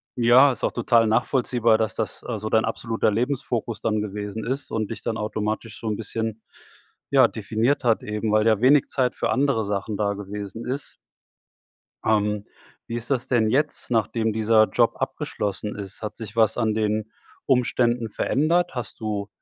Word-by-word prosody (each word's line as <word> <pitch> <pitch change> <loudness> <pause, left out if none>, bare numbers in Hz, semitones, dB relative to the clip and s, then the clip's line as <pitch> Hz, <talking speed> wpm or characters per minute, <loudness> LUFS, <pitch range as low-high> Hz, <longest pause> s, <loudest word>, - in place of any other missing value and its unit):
ja, 125 +4 +6
ist 120 - -7
auch - - 0
total 115 -1 +3
nachvollziehbar, 120 0 +2
das, 110 -1 -1
dass, 110 - -3
äh, 115 - -2
so 110 +1 -4
dein 110 - +3
absoluter 115 -2 0
Lebensfokus 120 -1 -2
dann 110 -1 0
gewesen 105 +1 -5
ist 135 +3 -3
und 110 -1 -2
dich 115 - -6
dann 110 - -2
automatisch 110 +1 -3
so 115 - -6
'n 105 - 0
bisschen, 110 0 -4 0.7
ja, - - +6
definiert 120 +7 0
hat 115 -3 +2
eben, 105 0 -2
weil 110 +1 +3
ja 110 -2 +4
wenig 135 +2 +5
Zeit 125 -3 0
für - - -1
andere 130 -5 +1
Sachen 100 +1 -2
da 100 -1 0
gewesen 100 +2 -7
ist. 135 +3 -4 1.1
Ähm. 105 -1 +1 0.4
Wie 115 - -4
ist 120 - -6
das 130 -4 -1
denn 115 -4 +3
jetzt, 145 0 0
nachdem 110 0 +1
dieser 110 0 +4
Job 120 -1 +2
abgeschlossen 105 -7 -3
ist? 100 +1 -8
Hat 105 - -5
sich 110 -2 -8
was 110 -1 +3
an 110 -3 +1
den 110 0 -1 0.3
Umständen 120 -2 +2
verändert? 170 - +1
Hast 125 -2 -5
du 105 -2 -3
110 Hz, 175 wpm, -24 LUFS, 105-120 Hz, 1.1 s, ja